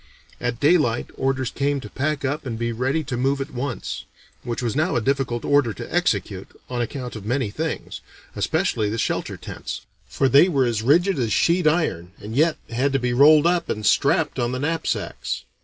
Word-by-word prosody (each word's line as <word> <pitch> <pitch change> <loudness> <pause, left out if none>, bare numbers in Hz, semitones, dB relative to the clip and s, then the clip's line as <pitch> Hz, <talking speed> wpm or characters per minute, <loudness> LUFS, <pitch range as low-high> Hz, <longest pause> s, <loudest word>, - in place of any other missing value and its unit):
At 120 -1 -2
daylight 145 -7 +2
orders 130 -1 -1
came 140 +1 0
to 105 - -8
pack 140 +5 -2
up 145 +4 -2
and 120 -4 -4
be 115 0 -1
ready 130 +7 0
to 130 - -4
move 135 +3 +1
at 135 +2 -5
once; 130 0 -4 0.4
which 120 0 -4
was 115 -3 -1
now 160 +5 +1
a - - +3
difficult 130 -1 -1
order 145 -6 +3
to - - -8
execute, - - 0 0.2
on 125 -1 -1
account 125 0 -4
of 110 - -7
many 120 0 -1
things, 160 +7 -4 0.3
especially 105 -2 0
the 110 - -3
shelter - - -2
tents; - - -7 0.3
for 135 - +1
they 140 +8 +6
were 135 -6 +2
as 115 -3 0
rigid 165 - +3
as 115 -3 0
sheet 170 - +3
iron 125 - 0
and 110 +2 -7
yet 155 +3 +3
had 135 +4 0
to 135 - +2
be 125 -1 -1
rolled 150 +4 +6
up 175 0 +1
and 105 0 -3
strapped 145 +4 +2
on 120 0 0
the 130 - -2
knapsacks. 160 +3 -2
135 Hz, 195 wpm, -23 LUFS, 120-150 Hz, 0.4 s, they